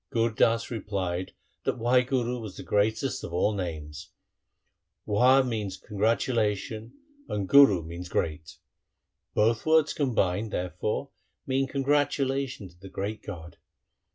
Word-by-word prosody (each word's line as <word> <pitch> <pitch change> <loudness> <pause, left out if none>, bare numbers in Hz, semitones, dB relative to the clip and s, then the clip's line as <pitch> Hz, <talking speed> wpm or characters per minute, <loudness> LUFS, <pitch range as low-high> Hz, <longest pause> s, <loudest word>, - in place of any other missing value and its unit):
' - - -57
Gur 115 0 +1
Das 115 +2 +2
replied 95 -5 -3 0.3
that - - -1
Wahguru 125 0 +1
was 105 -4 -8
the - - -7
greatest 110 +6 0
of 85 - -6
all 95 +5 +2
names. 80 -6 -5 0.5
' 90 +1 -53
Wah 125 +6 +5
means 105 -6 -3
congratula 110 0 +1
tion, 110 +3 -8 0.4
and 100 -2 -2
guru 120 - +7
means 85 +2 -7
great. 80 -1 -3 0.8
Both 110 +1 +2
words 160 -1 +3
combined, 110 - 0
therefore, 90 - -3 0.3
mean 135 0 0
congratulation 140 -4 0
to 85 0 -23
the 95 +1 -11
Great 100 +3 -4
God. 85 -5 -9
110 Hz, 130 wpm, -27 LUFS, 95-125 Hz, 0.8 s, guru